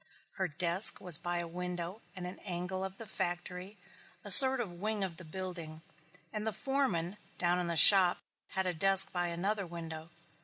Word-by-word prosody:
Her 190 -2 -4
desk 175 +5 +4
was 175 -4 -4
by 175 0 -6
a 175 0 -7
window 180 +3 -9
at 185 - -11
an 180 +1 -11
angle 185 0 -8
of 190 0 -10
the 225 - -13
factory, 180 +1 -9 0.5
a 205 - -6
sort 265 +5 +11
of 175 -7 -9
wing 215 -1 -5
of 175 -4 -9
the 185 - -13
building, 165 -2 -11 0.5
and 215 0 -7
the - - -3
foreman, 210 -11 -5 0.2
down 175 0 -2
in 175 - -6
the 170 -1 -5
shop, 185 +2 +5 0.4
had 190 0 -4
a 180 - -5
desk 195 +3 +1
by 175 -1 -5
another 190 +3 -6
window. 165 -1 -12
180 Hz, 185 wpm, -28 LUFS, 175-195 Hz, 0.5 s, sort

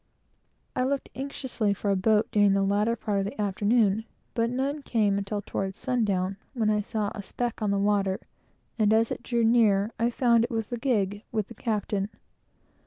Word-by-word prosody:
I - - +1
looked 275 +1 -1
anxiously 260 -6 -2
for 200 0 -1
a - - +3
boat, 210 +3 +3
during 205 -2 +4
the 195 0 +2
latter 205 +4 +2
part 210 -3 -1
of 195 - 0
the 200 - -6
afternoon, 210 +1 +2 0.3
but 230 -1 +1
none 275 +4 -1
came; 210 -6 +1
until 205 +1 -3
toward 195 -1 -3
sundown, 200 -7 0 0.2
when 220 -3 +2
I 210 0 +2
saw 210 -1 -2
a 210 - -5
speck 235 +4 -4
on 210 - +1
the 200 - +1
water, 195 -1 +1 0.6
and 215 0 +4
as 225 +1 +3
it - - -3
drew 235 -1 0
near, 220 -3 +4
I 230 +1 +3
found 235 -1 +3
it - - -1
was 225 -2 -2
the 240 - -4
gig, 205 -5 0
with 215 -3 -2
the - - -8
captain. 210 -3 -2
215 Hz, 190 wpm, -27 LUFS, 200-235 Hz, 0.6 s, during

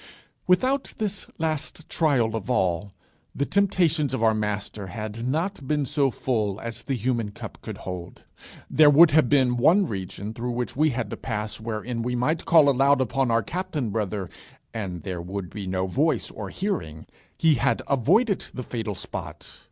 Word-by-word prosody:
Without 255 +9 +2
this 205 -2 -3
last 160 -1 -3
trial 130 -9 +2
of 110 +1 -5
all, 95 -4 +1 0.4
the 140 - 0
temptations 170 -8 +2
of 115 - -2
our 110 -1 +5
Master 105 -1 -3
had 110 +4 -5
not 160 +1 -2
been 150 -1 +1
so 140 0 +2
full 110 -5 -1
as 115 -1 -6
the 135 - -2
human 120 -2 -1
cup 100 - -9
could - - -7
hold; 90 -1 -7 0.4
there 155 -1 +6
would 155 +3 +8
have 150 -5 +4
been 130 -4 +3
one 175 +11 +5
region 100 - -5
through 120 +1 -3
which 120 0 -3
we 155 +3 +3
had 120 -5 -3
to - - -4
pass 105 -3 -4
wherein 115 +1 -3
we 125 +1 -1
might 150 +7 0
call 160 -3 +6
aloud 140 +1 +4
upon 130 0 +1
our 115 -1 +2
Captain 155 - -3
Brother, 105 -3 -2 0.5
and 95 -6 -4
there 90 -3 -4
would 90 0 -5
be 100 -3 -6
no 95 0 0
voice 145 - 0
or - - -6
hearing: 120 - -3 0.3
he 160 -1 +4
had 135 +1 +1
avoided 190 - +2
the 130 - -4
fatal 110 -4 -4
spot! - - -7
125 Hz, 175 wpm, -25 LUFS, 105-150 Hz, 0.5 s, would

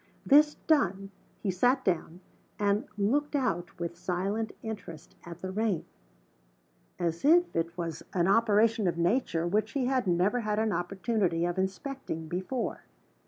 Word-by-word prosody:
This 300 +2 +6
done, 195 - +2 0.3
he 195 - +1
sat 245 +8 +2
down, 175 -1 -1 0.4
and 205 +5 +1
looked 285 +9 +1
out 180 -12 -1
with 170 0 -3
silent 190 +5 -2
interest 185 -8 -8
at 170 0 -9
the 185 - -3
rain 205 -4 0 1.1
as 170 -2 -2
if 345 +4 +4
it 165 +1 -1
was 165 -2 -4
an 175 -1 +1
operation 220 0 +3
of 170 - 0
Nature 170 -2 +1
which 215 +4 0
he 275 -3 0
had 255 -4 +1
never 185 +7 +2
had 210 -2 -1
an 220 0 +1
opportunity 185 -2 0
of 175 +1 -2
inspecting 190 - -4
before. 190 +9 -3
195 Hz, 145 wpm, -29 LUFS, 175-230 Hz, 1.1 s, This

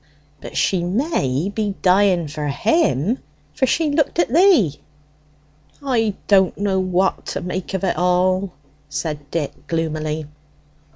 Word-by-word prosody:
"But - - -8
she 185 -3 +2
may 175 - 0
be 205 -2 -2
dying 185 -3 +3
for 150 0 -4
him, 200 - +1 0.3
for 265 - +1
she 305 +4 +1
looked 300 +1 0
at 340 -8 +1
thee." 320 - +4 1.0
"I 225 -7 +1
don't 190 -2 +4
know 195 -2 0
what 185 0 0
to - - -3
make 180 +2 -4
of 190 - -3
it 190 - +2
at - - -2
all," 180 +2 +2 0.4
said 145 -1 -4
Dick 150 -2 -4
gloomily. 155 -1 -2
185 Hz, 135 wpm, -20 LUFS, 160-215 Hz, 1.0 s, thee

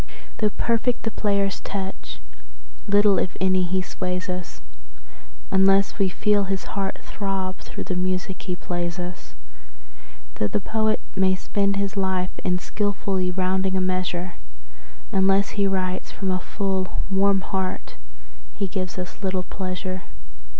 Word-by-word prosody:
Though 215 - +4
perfect 235 +3 +1
the 225 - 0
player's 200 -2 +1
touch, 190 - -5 0.7
little, 205 -2 +5
if 185 - -1
any, 185 -1 +3
he 185 +1 +1
sways 180 0 -2
us, 180 -1 -5 0.9
Unless 195 +2 +5
we 195 -1 +4
feel 205 +2 +3
his 195 0 -1
heart 195 -1 -1
throb 195 -2 -2
through - - -6
the 185 - -2
music 185 +1 -1
he 180 -2 -2
plays 175 0 -2
us. 180 0 -6 1.0
Though 105 - +3
the - - 0
poet 220 +1 +1 0.2
may 190 0 +4
spend 200 +1 +1
his 200 +1 -1
life 190 -2 +1
in 180 -1 +2
skilfully 195 -1 0
rounding 190 +1 +1
a - - +3
measure, 185 -1 0 0.8
Unless 195 +1 +4
he 200 -1 +1
writes 185 -1 0
from 190 -2 -1
a 185 - +1
full, 190 -1 -1
warm 195 0 +4
heart 190 -1 -3 0.6
he 200 - -1
gives 185 -1 -3
us 180 +2 -5
little 190 -2 0
pleasure. 185 0 -3
190 Hz, 140 wpm, -25 LUFS, 185-200 Hz, 1.0 s, little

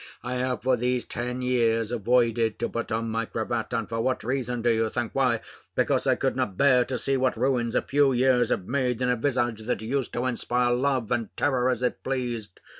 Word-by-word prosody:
I 125 - -3
have 125 0 -2
for 130 0 +3
these 125 +1 -1
ten 125 +1 -3
years 115 -3 +1
avoided 115 -1 +1
to 115 - -1
put 115 0 -4
on 115 +1 -1
my 115 +1 -1
cravat; 115 0 -3
and 115 -3 -1
for 115 0 -2
what 130 +2 -1
reason, 125 -1 -2
do 120 - +4
you 115 -1 +1
think? 120 -1 -3
Why, 125 -4 +2 0.3
because - - +1
I - - +4
could - - -1
not 95 - -2
bear 130 -3 +5
to 130 - -3
see 135 +2 +1
what 130 -2 +1
ruins 120 -2 0
a - - +2
few 140 -1 +3
years 125 0 +3
have 90 - -1
made 125 -3 0
in 125 - +1
a - - +2
visage, 120 -3 -1
that 110 -1 -2
used 130 +3 -2
to 120 +1 -1
inspire 125 -1 +1
love 130 -2 0
and 115 -3 0
terror 130 -3 +2
as 125 -1 -1
it 125 - -1
pleased. 120 -6 -3
125 Hz, 220 wpm, -26 LUFS, 115-130 Hz, 0.3 s, bear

